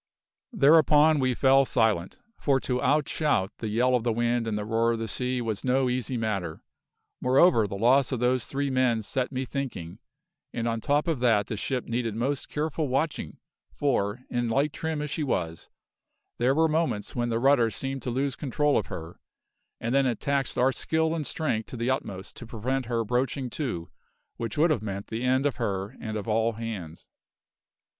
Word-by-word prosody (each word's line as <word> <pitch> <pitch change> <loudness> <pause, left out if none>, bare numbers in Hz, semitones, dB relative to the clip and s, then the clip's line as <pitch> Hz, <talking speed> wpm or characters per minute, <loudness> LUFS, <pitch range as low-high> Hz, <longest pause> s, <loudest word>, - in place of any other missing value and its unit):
Thereupon 155 - +5
we 130 -2 +1
fell 135 +1 +5
silent, 110 -9 0 0.2
for 135 -2 +2
to 125 -1 -1
out 145 +2 +2
shout 145 -12 +1
the 110 - -3
yell 120 +4 +2
of 125 - +3
the 120 - +1
wind 120 0 0
and 105 -2 -1
the 105 - -3
roar 115 +1 +2
of - - -2
the 115 0 -3
sea 125 +4 -2
was 110 -3 -3
no 130 0 +2
easy 125 0 -2
matter; 100 -8 -3 0.6
moreover 130 - +4
the 100 - -5
loss 130 +6 +4
of 130 - -1
those 125 0 +1
three 140 0 -2
men 125 -4 +2
set 125 +6 -2
me 130 0 -2
thinking, 125 -11 -5 0.5
and 115 0 -2
on 115 -1 -1
top 145 +5 +1
of 160 -6 0
that 115 -5 +3
the 110 - -4
ship 125 +4 -2
needed 115 -2 -2
most 130 +4 -2
careful 155 0 -2
watching, 140 +4 -2 0.4
for, 125 -4 0
in 120 -1 -1
light 140 +5 +1
trim 160 -2 -3
as 150 - -5
she - - -2
was, 85 - -2 0.7
there 125 +3 +3
were 160 +1 +4
moments 155 -9 -1
when 120 -1 0
the 115 - 0
rudder 125 -2 +4
seemed 135 +5 -4
to - - -4
lose 135 +2 -1
control 145 +1 +1
of 105 - -5
her, 80 +1 -8 0.6
and 115 +2 -2
then 135 -1 +3
it 120 -3 -1
taxed 140 -1 -1
our 130 +2 +4
skill 160 +4 0
and 155 -3 -3
strength 135 -10 -1
to 125 - -8
the 120 +3 0
utmost 95 -7 -4
to 120 - -9
prevent 125 +3 -2
her 115 -1 0
broaching 125 +2 -1
to, 115 - -4 0.5
which 115 +1 -4
would 160 +2 +4
have 125 - +1
meant 100 -2 -5
the 110 +1 -3
end 130 +2 +2
of 140 -5 0
her 100 +1 -2
and 110 -2 -4
of 105 - -6
all 115 +1 +1
hands. 105 -8 -7
125 Hz, 195 wpm, -27 LUFS, 110-140 Hz, 0.7 s, Thereupon